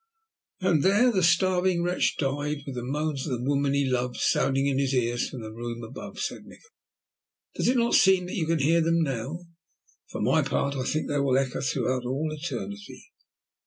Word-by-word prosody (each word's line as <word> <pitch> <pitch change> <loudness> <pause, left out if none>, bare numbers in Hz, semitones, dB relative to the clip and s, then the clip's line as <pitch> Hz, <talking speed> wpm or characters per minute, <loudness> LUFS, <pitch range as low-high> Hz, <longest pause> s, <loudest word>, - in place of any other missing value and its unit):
"And 175 -5 +2
there 205 - +4
the 190 -5 +1
starving 180 0 +2
wretch 180 +1 0
died 145 +1 -2
with 140 - -6
the 125 -1 -5
moans 145 +2 -2
of 130 -4 -1
the 120 - -6
woman 140 0 +1
he 140 0 +2
loved 125 -1 -1
sounding 135 0 +1
in 135 -1 +1
his 135 -1 0
ears 120 -1 0
from 125 - -8
the 110 - -7
room 120 0 -6
above," 110 - -9
said - - -4
Nikola. 455 - -17 0.8
"Does - - -1
it 250 +1 +3
not 235 0 +2
seem 190 -1 +5
that 180 - -7
you 165 -6 -1
can 165 0 +2
hear 160 +4 +3
them 165 0 +2
now? 135 +4 -3 0.7
For - - -6
my - - +3
part, 140 0 -1
I 130 -2 -3
think 155 - -1
they 145 - 0
will 135 -2 +2
echo 135 -2 -1
through 130 -2 0
all 140 +5 -2
eternity." 100 -9 -7
140 Hz, 200 wpm, -26 LUFS, 130-165 Hz, 0.8 s, seem